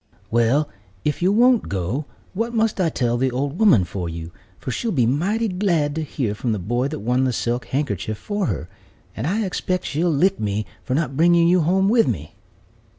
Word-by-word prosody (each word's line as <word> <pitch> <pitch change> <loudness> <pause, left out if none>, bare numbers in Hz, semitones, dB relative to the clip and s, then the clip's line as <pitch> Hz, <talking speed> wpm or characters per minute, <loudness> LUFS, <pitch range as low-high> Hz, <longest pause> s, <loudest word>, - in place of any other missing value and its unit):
"Well, 120 +6 +3 0.4
if 150 +2 -1
you 185 +2 +3
won't 245 +2 +4
go, 100 - -2 0.3
what 230 +4 -2
must 220 -3 +1
I 170 - +2
tell 120 -5 0
the 130 +2 +1
old 140 +5 -3
woman 200 - +5
for 90 0 -4
you, 80 0 -7 0.3
for 130 - -5
she'll 230 - -2
be 130 - +2
mighty 195 - +1
glad 180 -7 0
to 160 - -2
hear 135 -8 -2
from 115 +2 -2
the - - -1
boy 120 +8 -1
that 150 -4 -5
won 125 +4 +1
the 130 - +1
silk 120 +1 -2
handkerchief 110 - -2
for 205 - -2
her, 75 +4 -3 0.5
and 115 - -3
I 210 +5 0
expect 185 -1 -2
she'll 165 +4 0
lick 180 +6 +2
me 105 0 -1 0.2
for 130 - -2
not 140 -3 -1
bringing 170 +2 +4
you 180 +1 +4
home 190 +4 +2
with 230 - +4
me." 80 - -3
145 Hz, 205 wpm, -22 LUFS, 120-185 Hz, 0.5 s, woman